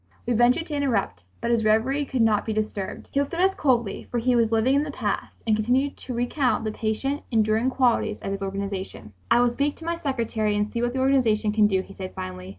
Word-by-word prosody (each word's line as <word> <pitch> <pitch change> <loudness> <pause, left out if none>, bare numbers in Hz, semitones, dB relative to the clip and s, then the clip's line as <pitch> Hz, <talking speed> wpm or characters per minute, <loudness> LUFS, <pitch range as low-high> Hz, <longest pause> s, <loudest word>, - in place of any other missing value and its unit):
we 245 - 0
ventured 245 +8 +3
to 310 - -7
interrupt. 225 - -1 0.2
But 235 - 0
his 230 -2 +2
reverie 235 +7 +2
could 260 -3 0
not 215 -2 +3
be 220 - -3
disturbed. 210 -2 -4
He 275 - +1
looked 285 +4 -1
at - - -4
us 380 +1 +4
coldly, 240 - 0
for 245 - -2
he 245 +1 +2
was 230 -2 +2
living 225 +4 +3
in 280 - +3
the 300 - -3
past, 285 - -4
and 220 -2 +3
continued 250 +6 +1
to 255 - -7
recount 245 +1 0
the 215 - -2
patient, 230 +7 -2
enduring 220 +1 +2
qualities 245 -5 +1
of 195 - -3
his 195 0 -4
organization. 195 - -5 0.2
"I - - +5
will 245 -1 +3
speak 285 +4 -1
to 325 - -11
my 335 0 -1
secretary 230 -7 -1
and 210 +1 -1
see 235 - -2
what 240 0 0
the 260 - -2
organization 235 -6 +2
can 210 0 +4
do," 190 -2 +1
he 195 - -13
said 185 -1 -7
finally. 90 0 -6
230 Hz, 240 wpm, -25 LUFS, 210-265 Hz, 0.2 s, I